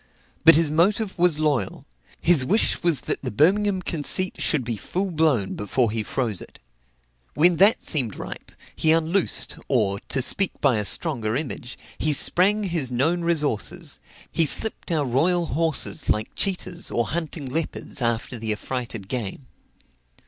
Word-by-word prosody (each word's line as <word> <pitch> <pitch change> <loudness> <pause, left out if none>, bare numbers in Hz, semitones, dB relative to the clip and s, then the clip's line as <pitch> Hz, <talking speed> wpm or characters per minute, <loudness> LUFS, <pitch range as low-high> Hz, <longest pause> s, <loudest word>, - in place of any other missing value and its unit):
But 165 - +9
his 160 -2 +2
motive 200 +6 +1
was 175 -3 +2
loyal; 145 -11 -1 0.3
his 165 -6 +5
wish 200 - +2
was 170 -7 +1
that - - -4
the - - -4
Birmingham 190 - +2
conceit 170 +4 0
should 150 -5 +3
be 120 -1 -3
full 185 - -3
blown 150 - +1
before 110 +3 -1
he 110 0 -2
froze 110 -3 -2
it. - - -13 0.8
When 170 +2 +4
that 200 +6 +4
seemed 125 -9 +1
ripe, - - -9 0.2
he 155 - +2
unloosed, 165 +4 0
or, 105 -7 0
to 130 +4 -1
speak 195 +7 +1
by 135 -5 +2
a 105 - -2
stronger 115 - +2
image, 130 -3 -5 0.2
he 155 - +1
sprang 200 +8 +3
his 170 -9 -2
known 150 +8 0
resources, 160 - -1 0.3
he 165 -2 +2
slipped 220 +2 +1
our 155 -3 0
royal 170 +8 +1
horses 160 +1 -2
like 105 0 0
cheetas, 185 -2 -2
or 120 -1 -1
hunting 160 -3 -4
leopards, 145 0 -3
after 120 +1 -1
the 110 -1 -2
affrighted 115 -2 -4
game. 120 +2 -5
150 Hz, 155 wpm, -23 LUFS, 120-175 Hz, 0.8 s, But